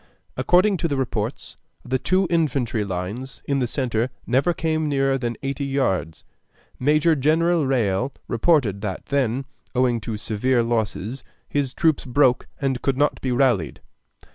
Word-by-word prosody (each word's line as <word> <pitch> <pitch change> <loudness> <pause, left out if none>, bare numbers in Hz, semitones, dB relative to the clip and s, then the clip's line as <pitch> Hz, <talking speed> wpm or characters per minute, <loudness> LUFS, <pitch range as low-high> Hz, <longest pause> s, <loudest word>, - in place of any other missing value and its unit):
According 185 +3 +3
to 165 - 0
the 140 -3 -1
reports, 115 -2 -3 0.3
the 130 +1 0
two 185 +8 +2
infantry 135 -9 +1
lines 100 +7 -5
in 140 -1 0
the 125 - 0
centre 120 -2 -1 0.2
never 135 +8 +2
came 160 -2 -1
nearer 135 -1 +2
than 120 -3 -2
eighty 140 +1 -2
yards. 95 - -1 0.6
Major 155 +4 +3
General 160 +2 +2
Riall 120 -1 +1 0.2
reported 115 - +2
that 100 -3 -4
then, 135 -2 0 0.3
owing 125 -2 +2
to 110 -1 -4
severe 120 +4 +1
losses, 115 +1 -2 0.2
his 140 -3 -1
troops 160 +2 +1
broke 125 -1 +2
and 135 -3 -1
could 135 -2 0
not 145 +1 +1
be 130 - -1
rallied. 120 - +1
130 Hz, 145 wpm, -23 LUFS, 115-145 Hz, 0.6 s, According